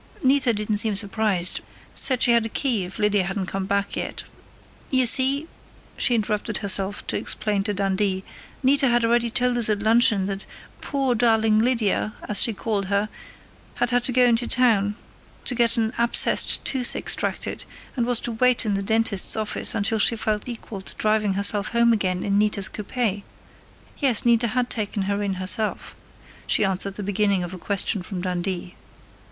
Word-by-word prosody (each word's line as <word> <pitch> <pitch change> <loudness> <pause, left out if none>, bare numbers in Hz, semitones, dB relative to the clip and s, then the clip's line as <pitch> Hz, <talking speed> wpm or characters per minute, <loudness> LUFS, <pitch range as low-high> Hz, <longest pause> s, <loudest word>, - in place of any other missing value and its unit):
"Nita 265 -1 +3
didn't 210 -1 -2
seem 210 0 +2
surprised; 200 -3 0 0.3
said 255 -3 +2
she 245 - +5
had 235 -1 +3
a - - -11
key, 230 -6 -1
if 180 - -9
Lydia 210 -2 +1
hadn't 190 +1 -3
come 190 0 -4
back 200 0 -1
yet.... - - -5 0.7
You 260 -2 +3
see," 270 +6 +4 0.5
she 245 - +2
interrupted 215 -1 -1
herself 200 0 -1
to - - -2
explain 210 -2 -1
to 210 - -1
Dundee, 195 0 -1 0.4
"Nita 275 +1 +4
had 240 -1 +2
already 235 0 +2
told 245 +1 0
us 225 - +2
at 205 -1 -1
luncheon 220 -3 +3
that 195 0 -4 0.3
'poor, 270 -3 -1
darling 225 -2 +2
Lydia,' 220 -3 0
as 210 - +3
she 230 - +4
called 210 -1 -3
her, 200 +2 0 0.7
had 245 0 -1
had 245 0 +1
to - - +2
go 250 0 +3
in 240 -1 +4
to 240 - -2
town 210 -5 +2 0.5
to - - +2
get 235 0 +3
an 225 0 0
abscessed 235 0 +3
tooth 255 -2 0
extracted, - - -3 0.3
and 240 -3 -1
was 245 -2 +2
to 240 - -3
wait 250 +1 +1
in 210 - 0
the 195 - -1
dentist's 220 -1 +1
office 215 -1 -2
until 220 +2 0
she 230 - +4
felt 215 +1 -2
equal 225 -4 -8
to - - -9
driving 215 -2 0
herself 200 +1 +2
home 235 0 +4
again 185 -4 -1
in 200 0 +1
Nita's 210 -2 +1
coupe.... 210 -1 -3 0.8
Yes, 255 -7 +2
Nita 235 0 +3
had 245 +2 -1
taken 210 -2 -2
her 200 +1 -2
in 200 -2 -2
herself," 195 +4 0 0.5
she 210 - +3
answered 195 +1 -1
the 205 - -6
beginning 200 -1 0
of 175 +1 -6
a 185 - -8
question 200 +1 -2
from 180 0 -6
Dundee. 180 0 -4
215 Hz, 180 wpm, -23 LUFS, 200-235 Hz, 0.8 s, she